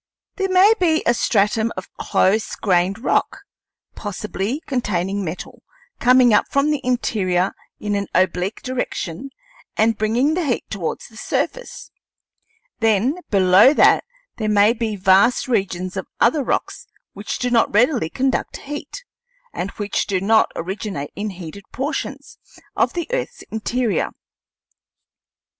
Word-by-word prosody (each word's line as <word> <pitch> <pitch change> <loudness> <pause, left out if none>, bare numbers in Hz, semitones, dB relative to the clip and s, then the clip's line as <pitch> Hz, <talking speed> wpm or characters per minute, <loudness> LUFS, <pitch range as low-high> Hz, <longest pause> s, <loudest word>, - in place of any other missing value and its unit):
There 385 -1 -1
may 375 +4 +6
be 325 -3 +2
a 235 - +4
stratum 220 0 +1
of 185 - -6
close 215 +3 +1
grained 185 0 +1
rock, 240 - 0 0.5
possibly 210 +4 -4
containing 200 -6 -1
metal, 170 0 -7 0.4
coming 250 -1 +5
up 210 - +4
from 280 +2 +2
the 295 -2 -1
interior 195 -7 0 0.3
in 210 -1 -2
an 200 -1 -1
oblique 185 +2 0
direction 255 -3 -4 0.5
and 225 +1 +3
bringing 235 +8 +2
the 355 +1 0
heat 260 -6 -1
towards 185 -6 -4
the 220 - -17
surface; - - -3 0.9
then 225 - +2
below 195 +7 +6
that - - +5 0.3
there 215 -2 -1
may 210 +1 +5
be 225 -2 -3
vast 195 +7 +3
regions 185 -5 -1
of 190 - -4
other 270 +5 +3
rocks - - -3 0.3
which 205 +2 -5
do 245 -1 -2
not 230 -2 +3
readily 235 - +2
conduct 265 +4 -1
heat, 295 - -7 0.5
and 185 - -3
which 205 -1 -2
do 190 -2 0
not 220 +3 +3
originate 185 -4 -5
in 210 +1 -3
heated 190 +1 -9
portions 280 +5 -5 0.4
of - - +1
the 345 -2 -2
earth's - - -3
interior. 225 +1 -1
215 Hz, 135 wpm, -20 LUFS, 195-255 Hz, 0.9 s, may